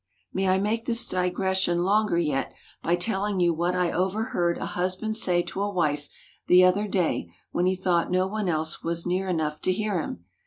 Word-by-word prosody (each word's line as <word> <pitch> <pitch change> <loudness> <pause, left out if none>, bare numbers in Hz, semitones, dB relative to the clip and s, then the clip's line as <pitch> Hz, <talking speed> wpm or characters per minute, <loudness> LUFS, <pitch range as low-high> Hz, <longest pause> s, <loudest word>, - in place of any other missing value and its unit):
May 190 0 0
I 185 - +4
make 215 +4 -1
this 235 -1 +1
digression 180 -1 +1
longer 205 -1 +2
yet, 150 -5 0 0.3
by 170 - +2
telling 195 +1 -1
you 175 -1 +3
what 175 +3 0
I 180 -1 +1
overheard 185 -2 0
a - - -4
husband 185 +5 -2
say 180 -6 +2
to 195 - -5
a 205 - 0
wife 150 -6 -1 0.4
the 180 +1 +7
other 190 +3 +3
day 175 - -1 0.2
when 180 - +1
he 190 - +2
thought 180 -2 +1
no 185 +1 +2
one 205 0 -2
else 160 0 -2
was 170 0 -2
near 185 +2 0
enough 155 -3 -1
to 185 - +1
hear 200 -2 -1
him. 85 - -7
185 Hz, 195 wpm, -26 LUFS, 170-195 Hz, 0.4 s, the